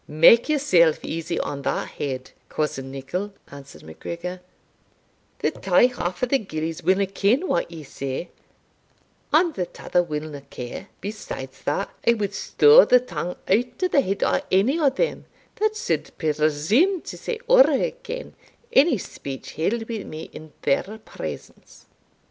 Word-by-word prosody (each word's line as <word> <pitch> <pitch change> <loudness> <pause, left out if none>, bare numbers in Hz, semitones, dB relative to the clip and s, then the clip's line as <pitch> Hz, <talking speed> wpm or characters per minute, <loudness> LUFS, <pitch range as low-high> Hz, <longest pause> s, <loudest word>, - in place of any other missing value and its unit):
"Make 165 - +6
yourself 180 - +4
easy 165 +1 -3
on 140 -1 -4
that - - -2
head, 130 -2 -5 0.2
cousin 135 -3 -2
Nicol," 140 +10 -4 0.2
answered 140 -1 -12
MacGregor; 170 - -7 1.0
"the - - 0
tae - - +3
half 180 -5 -4
o' - - +6
the 270 +2 +2
gillies 160 -4 -4
winna 190 +2 +3
ken 205 - +1
what 170 - 0
ye 165 -2 -9
say, 140 +4 -5 1.0
and 325 +2 +4
the 180 -8 -2
tother 180 - 0
winna 150 -3 -5
care 125 +10 -7
besides 135 -10 -7
that, 150 +7 -1 0.2
I 235 - +6
wad 205 -2 -2
stow 445 - +6
the 250 - +5
tongue 175 -7 -5
out 245 - +1
o' - - +4
the 285 - +3
head 195 -5 -1
o' - - +2
any 225 - +3
o' 295 -4 +4
them 485 - -2 0.3
that 430 0 +1
suld 440 - -2
presume 160 - +2
to - - -8
say 475 - -4
ower - - +7
again - - -3 0.4
ony 275 -1 +6
speech 140 -7 -7
held 225 +8 -1
wi' 225 -4 -4
me 155 +1 -8
in 155 -1 -11
their 140 - +2 0.2
presence." - - -9
185 Hz, 150 wpm, -24 LUFS, 155-250 Hz, 1.0 s, ower